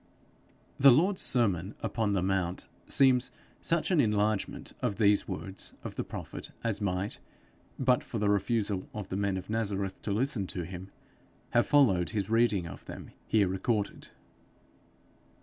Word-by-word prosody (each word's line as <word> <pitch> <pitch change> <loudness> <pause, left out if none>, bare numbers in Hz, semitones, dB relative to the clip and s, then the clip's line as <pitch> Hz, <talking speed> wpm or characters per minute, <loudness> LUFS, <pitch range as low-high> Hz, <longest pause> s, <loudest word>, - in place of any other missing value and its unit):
The 140 - +9
Lord's 180 +9 +3
sermon 100 -5 +1
upon 110 -3 0
the 95 -3 +1
mount 95 -2 -1 0.2
seems 130 -2 +4 0.3
such 170 +2 0
an 170 -5 +5
enlargement 105 -2 0
of 100 - 0
these 105 -1 +3
words 95 0 -4
of - - -6
the - - -2
prophet - - -7
as 115 -3 -1
might, 95 0 -1 0.6
but 125 -2 +2
for 115 - -5
the 105 -1 +1
refusal 100 -1 0
of 105 -3 -5
the - - -3
men 100 -1 0
of 95 - -7
Nazareth 100 -3 -2
to 105 - -3
listen 110 -2 0
to 90 - -4
him, 90 +2 -8 0.6
have 120 - +3
followed 100 - +4
his 100 +1 -2
reading 115 -6 +3
of 85 - -9
them - - -9 0.2
here 105 -3 +3
recorded. 100 +2 -2
105 Hz, 150 wpm, -30 LUFS, 95-115 Hz, 0.6 s, The